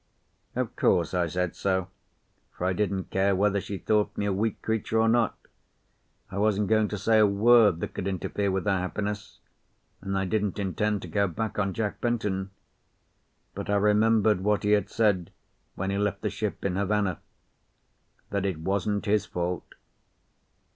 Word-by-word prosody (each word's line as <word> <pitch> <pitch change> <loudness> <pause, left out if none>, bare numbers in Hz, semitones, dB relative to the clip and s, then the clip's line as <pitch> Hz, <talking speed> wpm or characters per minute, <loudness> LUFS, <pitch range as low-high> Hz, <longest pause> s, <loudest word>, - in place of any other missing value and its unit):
Of - - -2
course 85 -1 +2
I 90 -2 +1
said 90 +1 -2
so, 95 -2 0 0.7
for 90 - -4
I 95 - +2
didn't 95 -1 -2
care 95 +1 +2
whether 100 +1 +2
she 100 - -5
thought 105 +4 0
me 100 - -1
a 100 - +1
weak 105 +2 -1
creature 110 0 0
or 110 - +4
not. 115 -1 +2 0.9
I 100 - -3
wasn't 105 -1 +1
going 110 -1 +3
to 105 - -4
say 110 +3 +3
a 105 - +6
word 105 -3 +5
that - - -4
could 95 - -4
interfere 100 +2 -1
with 95 0 -1
her 100 -2 +2
happiness, 100 +2 -4 0.6
and 95 0 -2
I 95 - 0
didn't 105 0 -1
intend 105 +1 -1
to - - -6
go 100 -1 +1
back 105 +4 -3
on 95 -2 0
Jack 105 -2 -2
Benton; 105 -5 -1 1.0
but - - -6
I 100 - +2
remembered 105 0 +3
what 105 +1 +1
he 105 - +2
had 105 -1 +2
said 100 -6 +1 0.4
when 95 +1 -2
he 100 - -1
left 105 -1 -1
the - - 0
ship - - -4
in 95 -1 0
Havana: 100 -3 0 1.1
that 100 -1 -1
it 95 -5 -2
wasn't 100 +4 -1
his 105 0 +1
fault. 90 0 -4
100 Hz, 175 wpm, -27 LUFS, 95-105 Hz, 1.1 s, a